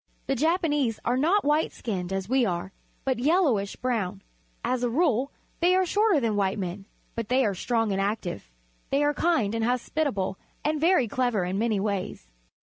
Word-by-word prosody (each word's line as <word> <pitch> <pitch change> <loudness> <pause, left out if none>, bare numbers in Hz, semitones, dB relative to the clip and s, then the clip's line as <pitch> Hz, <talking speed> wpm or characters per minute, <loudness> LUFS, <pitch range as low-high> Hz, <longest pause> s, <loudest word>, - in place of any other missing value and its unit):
The 270 - 0
Japanese 295 - +1
are 245 - +2
not 340 +10 +2
white 300 +2 +2
skinned, 190 -6 -4
as 195 -1 -2
we 260 +2 +3
are, 190 -2 -2 0.3
but 260 -3 0
yellowish 270 - +2
brown. 230 -8 -2 0.4
As 255 -1 0
a 245 - +1
rule 270 -1 +1 0.3
they 355 +2 +4
are 375 0 +3
shorter 410 -2 +3
than 230 -4 0
white 195 -1 +1
men, 190 0 -4 0.3
but 230 -2 -4
they 255 +1 +3
are 205 - +1
strong 225 +3 0
and 195 0 0
active. 195 - -3 0.4
They 280 +2 +2
are 295 0 +2
kind 270 -12 +1
and 225 0 -1
hospitable 245 -5 -1 0.3
and 305 0 0
very 330 -7 +4
clever 245 -3 0
in 185 +2 -2
many 220 -2 +1
ways. 200 -2 -3
240 Hz, 180 wpm, -26 LUFS, 200-295 Hz, 0.4 s, they